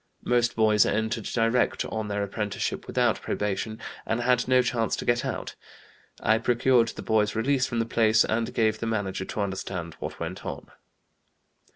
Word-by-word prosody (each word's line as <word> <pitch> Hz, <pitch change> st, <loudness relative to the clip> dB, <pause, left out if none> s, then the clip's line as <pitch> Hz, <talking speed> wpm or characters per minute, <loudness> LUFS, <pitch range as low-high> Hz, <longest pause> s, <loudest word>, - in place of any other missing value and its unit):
Most 120 Hz, -1 st, +2 dB
boys 110 Hz, -2 st, +4 dB
entered 110 Hz, 0 st, -1 dB
direct 115 Hz, +1 st, +1 dB
on 110 Hz, -1 st, -3 dB
their 105 Hz, 0 st, -1 dB
apprenticeship 105 Hz, 0 st, -3 dB
without -, -, +1 dB
probation, 105 Hz, +2 st, -2 dB, 0.3 s
and 115 Hz, +2 st, -1 dB
had 125 Hz, 0 st, +2 dB
no 130 Hz, 0 st, +4 dB
chance 115 Hz, -2 st, 0 dB
to -, -, -6 dB
get 120 Hz, 0 st, +2 dB
out. -, -, -4 dB, 0.7 s
I 110 Hz, +1 st, +3 dB
procured 120 Hz, 0 st, +3 dB
the -, -, -7 dB
boy's 105 Hz, -1 st, +1 dB
release 130 Hz, +3 st, +1 dB
from 120 Hz, -, -3 dB
the 115 Hz, -, +1 dB
place 110 Hz, -1 st, +3 dB
and 115 Hz, +1 st, -1 dB
gave 110 Hz, -1 st, +1 dB
the 115 Hz, -, -3 dB
manager 100 Hz, -4 st, -2 dB
to 105 Hz, -, -4 dB
understand 95 Hz, -4 st, -4 dB
what -, -, -6 dB
went -, -, -5 dB
on." -, -, -7 dB
110 Hz, 170 wpm, -26 LUFS, 105-120 Hz, 0.7 s, boys